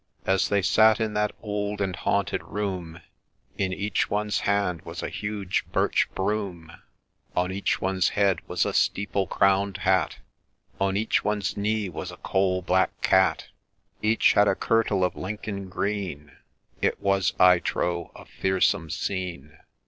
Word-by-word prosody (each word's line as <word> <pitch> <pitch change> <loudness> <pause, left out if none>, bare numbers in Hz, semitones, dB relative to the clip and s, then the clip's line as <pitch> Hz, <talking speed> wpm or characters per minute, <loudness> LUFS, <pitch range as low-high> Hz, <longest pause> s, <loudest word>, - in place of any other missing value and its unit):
As 95 0 +2
they 100 -2 +2
sat 110 +3 +5
in 110 -1 -1
that 105 0 +1
old 105 -1 -3
and 95 -2 -1
haunted 100 0 0
room, 90 -5 -4 0.6
In 95 -2 0
each 100 +2 -1
one's 105 0 0
hand 100 -4 0
was - - -7
a - - -2
huge 105 -3 -2
birch - - +2
broom, 95 -5 -2 0.6
On 90 +1 +1
each 100 +1 -1
one's 95 -1 +1
head 100 -4 +3
was - - 0
a - - -2
steeple 100 -1 +1
crown'd 100 0 +2
hat, 95 -2 +2 0.6
On 95 0 +1
each 110 +2 +1
one's 105 -2 -1
knee 105 0 0
was 90 - -6
a - - -11
coal 95 -1 0
black 95 +1 +1
cat; 95 0 +3 0.5
Each 110 +2 +4
had 105 0 +5
a 95 - +3
kirtle 110 -4 +1
of 90 - 0
Lincoln 100 0 -5
green 95 -7 -3 0.3
— - - -37
It - - +1
was, 100 -2 +1
I 90 -1 +7
trow, 85 0 -2
a - - -12
fearsome 95 -3 0
scene. 85 -5 -4
95 Hz, 155 wpm, -26 LUFS, 90-105 Hz, 0.6 s, I